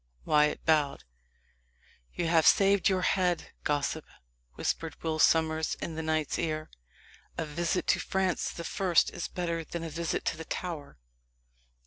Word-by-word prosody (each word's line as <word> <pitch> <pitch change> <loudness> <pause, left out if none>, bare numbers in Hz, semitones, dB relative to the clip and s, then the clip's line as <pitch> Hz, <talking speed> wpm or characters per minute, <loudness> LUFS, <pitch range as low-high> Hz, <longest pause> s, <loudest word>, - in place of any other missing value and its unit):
Wyat 150 0 +2
bowed. 150 -3 +2 1.1
"You 175 - -2
have 165 -1 +4
saved 200 0 +5
your 185 -1 +1
head, 180 -3 +1
gossip," 145 +1 -1 0.5
whispered 165 -2 -2
Will 160 -1 -1
Sommers 160 0 +3
in 165 - -5
the 160 - -3
knight's 155 -2 -1
ear. 155 -2 -2 0.7
"A 165 - -1
visit 170 +4 -1
to - - +4
Francis 190 -2 0
the 170 - -7
First 180 0 +2
is 175 - -4
better 170 -2 -3
than 165 +2 -6
a 165 - -5
visit 165 +1 -2
to - - -1
the 160 - -7
Tower." 155 - -5
165 Hz, 145 wpm, -29 LUFS, 155-175 Hz, 1.1 s, saved